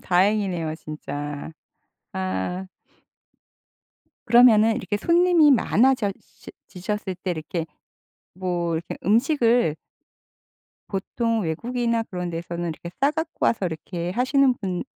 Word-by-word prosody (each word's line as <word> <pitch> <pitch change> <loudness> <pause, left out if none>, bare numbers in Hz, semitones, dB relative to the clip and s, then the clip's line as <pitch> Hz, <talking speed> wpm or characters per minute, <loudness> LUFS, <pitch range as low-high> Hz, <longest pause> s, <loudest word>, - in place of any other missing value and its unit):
다행이네요 180 -4 +1
진짜. 145 -2 -6 0.6
아. 95 - -3 1.6
그러면은 225 -2 +6
이렇게 205 - -2
손님이 340 - +4
많아져 245 -4 +3
시 - - -15 0.2
지셨을 190 +1 -4
때 185 - -2
이렇게 165 0 -3 0.7
뭐 175 -2 -2
이렇게 165 +1 -4
음식을 235 - +3 1.1
보통 225 +3 -1
외국이나 230 +7 -1
그런 180 -4 -5
데서는 170 0 -4
이렇게 170 +2 -8
싸 280 +2 +4
갖고 320 +1 -3
와서 200 -5 +1
이렇게 170 +2 -5
하시는 255 +4 +3
분 185 -3 -3
195 Hz, 250 characters per minute, -24 LUFS, 170-240 Hz, 1.6 s, 그러면은